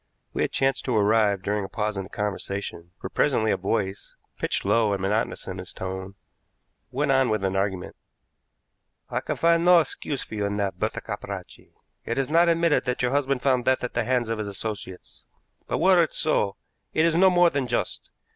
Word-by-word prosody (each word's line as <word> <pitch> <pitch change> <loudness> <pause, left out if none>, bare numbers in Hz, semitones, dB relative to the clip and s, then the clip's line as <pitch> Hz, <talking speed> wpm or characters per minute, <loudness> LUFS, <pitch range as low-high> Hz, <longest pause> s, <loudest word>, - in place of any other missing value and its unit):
We - - -2
had - - 0
chanced 135 0 +1
to 125 -4 +1
arrive 105 -2 +3
during 105 +1 -1
a 95 - -6
pause 105 +1 -2
in 95 -1 -4
the - - -13
conversation, 100 -4 -4
for - - -5
presently 110 -7 +1
a - - +3
voice, 95 0 -2 0.2
pitched - - -1
low 110 -3 +3
and 100 - -1
monotonous 105 +3 -1
in 95 0 -6
its 90 - -8
tone, 95 +1 -6 0.7
went 135 +3 0
on 130 -1 +3
with 110 -2 0
an 95 0 0
argument: 95 -2 -2 1.2
"I - - -1
can - - -3
find 170 0 +3
no 180 0 +7
excuse 145 -3 -1
for - - -12
you 105 -1 -1
in 100 0 -3
that, 100 -2 -2
Bertha - - -2
Capracci. - - -8 0.3
It 115 - -3
is 135 +1 -1
not 170 +1 +5
admitted 165 -2 +2
that 125 0 -1
your 125 - +2
husband 140 -2 0
found 130 -3 +2
death 130 0 +2
at 125 - -3
the 120 - 0
hands 125 -1 0
of 115 -1 -2
his 105 - -3
associates, 100 -2 -7 0.4
but, - - -1
were 185 -2 +5
it 165 - -1
so, 105 -10 +1 0.4
it 160 - +4
is 165 -1 +2
no 190 +2 +6
more 175 -1 +4
than 140 -3 -1
just. - - -3
115 Hz, 205 wpm, -25 LUFS, 100-140 Hz, 1.2 s, no